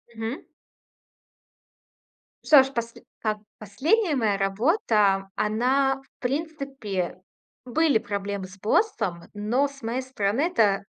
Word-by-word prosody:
Мгм. 225 Hz, +4 st, -4 dB, 2.0 s
Что 290 Hz, -3 st, +8 dB
ж, 270 Hz, +1 st, -7 dB
посль 235 Hz, -1 st, -4 dB, 0.2 s
так, 215 Hz, -1 st, 0 dB, 0.2 s
последняя 300 Hz, -, +1 dB
моя 220 Hz, -5 st, +1 dB
работа, 200 Hz, -, +2 dB
она, 260 Hz, +6 st, +2 dB
в -, -, -35 dB
принципе, 270 Hz, -, -3 dB, 0.4 s
были 280 Hz, 0 st, +3 dB
проблемы 200 Hz, -3 st, -4 dB
с 190 Hz, +1 st, -14 dB
боссом, 195 Hz, -, 0 dB
но 235 Hz, +7 st, +1 dB
с 275 Hz, -2 st, -15 dB
моей 235 Hz, +3 st, -1 dB
стороны 245 Hz, -2 st, -1 dB
это 220 Hz, -, +2 dB
230 Hz, 110 wpm, -25 LUFS, 200-275 Hz, 2.0 s, Что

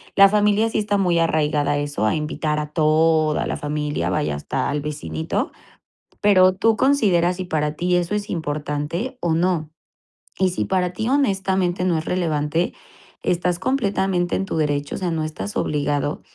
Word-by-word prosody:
la 195 Hz, 0 st, +8 dB
familia 210 Hz, +2 st, +2 dB
sí 220 Hz, -, -1 dB
está 205 Hz, -1 st, 0 dB
muy 180 Hz, -3 st, +2 dB
arraigada 150 Hz, -3 st, +1 dB
a -, -, 0 dB
eso, 145 Hz, -6 st, -2 dB
a 110 Hz, -, +2 dB
invitar 150 Hz, 0 st, -2 dB
a 150 Hz, 0 st, -5 dB
toda 155 Hz, 0 st, +2 dB
la -, -, -2 dB
familia, 150 Hz, 0 st, -2 dB
vaya, 150 Hz, -, -1 dB
hasta 75 Hz, -, -2 dB
al 145 Hz, +1 st, -1 dB
vecinito. 80 Hz, -, -3 dB, 0.7 s
Pero 185 Hz, -2 st, +5 dB
tú 225 Hz, +2 st, +2 dB
considera 195 Hz, -11 st, +3 dB
si 185 Hz, +1 st, -5 dB
para 150 Hz, -3 st, -1 dB
ti 180 Hz, +2 st, 0 dB
eso 175 Hz, +3 st, -1 dB
es 205 Hz, 0 st, -3 dB
importante 155 Hz, -, -3 dB
o 170 Hz, -2 st, +1 dB
no. 165 Hz, -2 st, 0 dB, 0.7 s
Y 190 Hz, -1 st, +3 dB
si 180 Hz, -, -2 dB
para 180 Hz, -2 st, 0 dB
ti, 220 Hz, +5 st, -3 dB
honestamente, 190 Hz, -8 st, +1 dB
no 175 Hz, -3 st, +2 dB
es 155 Hz, -, -7 dB
relevante, 165 Hz, -2 st, 0 dB, 0.5 s
estás 175 Hz, 0 st, 0 dB
completamente 195 Hz, -7 st, 0 dB
en 195 Hz, -, -1 dB
tu 190 Hz, -, -3 dB
derecho, 145 Hz, -2 st, -1 dB
o -, -, -4 dB
sea, 180 Hz, -2 st, -2 dB
no 160 Hz, -1 st, -1 dB
estás 155 Hz, +8 st, -5 dB
obligado 145 Hz, -3 st, -1 dB
170 Hz, 175 wpm, -22 LUFS, 150-190 Hz, 0.7 s, la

